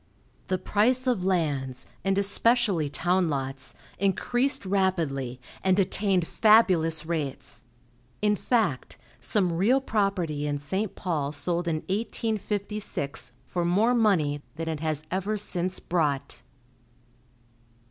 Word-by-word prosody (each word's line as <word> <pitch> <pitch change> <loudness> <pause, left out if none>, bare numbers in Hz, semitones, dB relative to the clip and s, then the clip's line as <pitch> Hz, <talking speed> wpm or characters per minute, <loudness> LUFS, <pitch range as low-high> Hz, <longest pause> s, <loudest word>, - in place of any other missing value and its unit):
The 185 - +1
price 230 +7 +2
of 245 -8 +1
lands, 145 -9 -1 0.2
and 195 0 +1
especially 200 - +2
town 175 +3 +1
lots, 135 -1 -4 0.2
increased 245 +7 0
rapidly, 165 -10 0 0.2
and 190 0 +3
attained 195 -2 +1
fabulous 175 -8 +4
rates; 155 -5 -3 0.6
in 210 0 +2
fact, 210 - 0 0.2
some 185 -5 +1
real 210 +11 +3
property 190 - -1
in 145 0 -1
St. 190 +9 -3
Paul 150 -6 -2
sold 175 +3 -2
in 155 -2 0
1856 210 -5 -2
for 175 - -2
more 205 +8 +3
money 175 -11 +2
than 165 +1 -4
it 160 -2 -2
has 155 -1 -2
ever 195 +4 -1
since 185 -2 -3
brought. 150 -6 -1
185 Hz, 115 wpm, -27 LUFS, 155-205 Hz, 0.6 s, fabulous